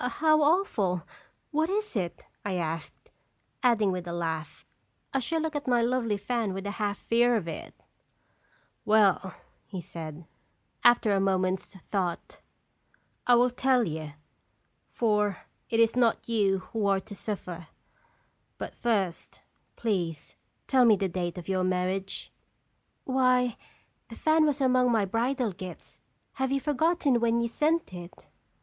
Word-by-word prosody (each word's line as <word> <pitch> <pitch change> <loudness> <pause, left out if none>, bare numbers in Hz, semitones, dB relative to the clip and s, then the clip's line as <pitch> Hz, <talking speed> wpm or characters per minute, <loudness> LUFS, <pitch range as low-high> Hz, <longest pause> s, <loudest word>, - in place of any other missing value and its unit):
"Oh, - - +1
how 310 +4 +3
awful! 265 - +2 0.5
What 315 +2 +1
is 420 - -2
it?" 180 -5 -3 0.2
I 200 -2 -2
asked, 165 -2 -4 0.5
adding 220 -5 +3
with 180 -1 -4
a - - -3
laugh, 165 -2 -4 0.2
" - - -41
I 270 - +2
shall 325 +6 -1
look 320 -1 -3
at 290 -1 -3
my 240 -2 +3
lovely 235 -3 +1
fan 210 -1 -2
with 195 +1 -5
a 205 - -2
half 205 -1 0
fear 240 +1 +3
of 205 -7 -1
it." 165 - -7 1.1
"Well," 200 -3 +3 0.3
he 190 - -6
said, 160 -1 -8 0.6
after 240 -3 +5
a 195 - +2
moment's 190 0 0 0.2
thought, 185 -4 -2 0.9
".I 245 - +7
will 245 +1 +4
tell 255 0 +2
you, 155 -5 -4 0.8
for 210 -4 +1 0.3
it 225 - +1
is 230 0 +4
not 240 -2 +2
you 205 -4 +2 0.2
who 215 -3 0
are 195 -1 +3
to 205 - -10
suffer. 180 -4 -5 0.9
But, - - -6
first, 200 -7 -2 0.3
please 175 -8 -2 0.3
tell 260 -2 +4
me 225 -3 +7
the 195 -1 -1
date 175 0 -3
of 175 - -7
your 190 -1 0
marriage." 185 +1 -2 0.4
" - - -46
Why 255 -2 +2 0.5
the - - -9
fan 315 0 +3
was 290 -1 0
among 255 -1 +4
my 220 -3 +3
bridal 235 +3 0
gifts! 185 0 -10 0.4
Have 265 0 +1
you 275 - +2
forgotten 295 -1 +2
when 235 0 +2
you 235 - +1
sent 305 - 0
it?" 175 0 -10
215 Hz, 150 wpm, -28 LUFS, 185-250 Hz, 1.1 s, I